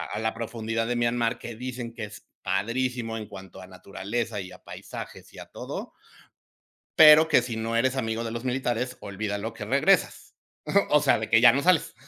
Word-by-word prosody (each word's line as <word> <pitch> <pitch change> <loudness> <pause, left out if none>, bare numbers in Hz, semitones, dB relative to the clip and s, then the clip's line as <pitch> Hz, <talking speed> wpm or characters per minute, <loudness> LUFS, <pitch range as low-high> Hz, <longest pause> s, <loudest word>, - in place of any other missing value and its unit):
a - - -3
a - - -2
la 110 0 -1
profundidad 115 0 -3
de 120 - -1
Myanmar, 120 0 0
que 120 -2 -8
dicen 125 -1 -6
que 115 -2 -6
es 105 - -13 0.2
padrísimo 115 +3 -2
en 110 -1 -7
cuanto 95 -2 -11
a 95 - -11
naturaleza 100 +4 -5
y 95 -1 -9
a - - -16
paisajes - - -10
y - - -11
a - - -10
todo, - - -7 1.0
pero 155 0 +8
que 145 - +5
si 120 -2 -5
no 115 +1 -2
eres 130 +2 +1
amigo 115 -2 -2
de 115 - -4
los 120 +2 -6
militares, 125 -1 -1
olvida 100 +1 -4
lo 110 +2 -5
que 110 -2 -7
regresas. 140 - +1 0.6
O 150 0 +5
sea, 135 -6 +3
de 110 - -5
que 115 0 +5
ya 120 - +9
no 140 - 0
sales. 180 -2 +2
115 Hz, 205 wpm, -26 LUFS, 110-125 Hz, 1.0 s, ya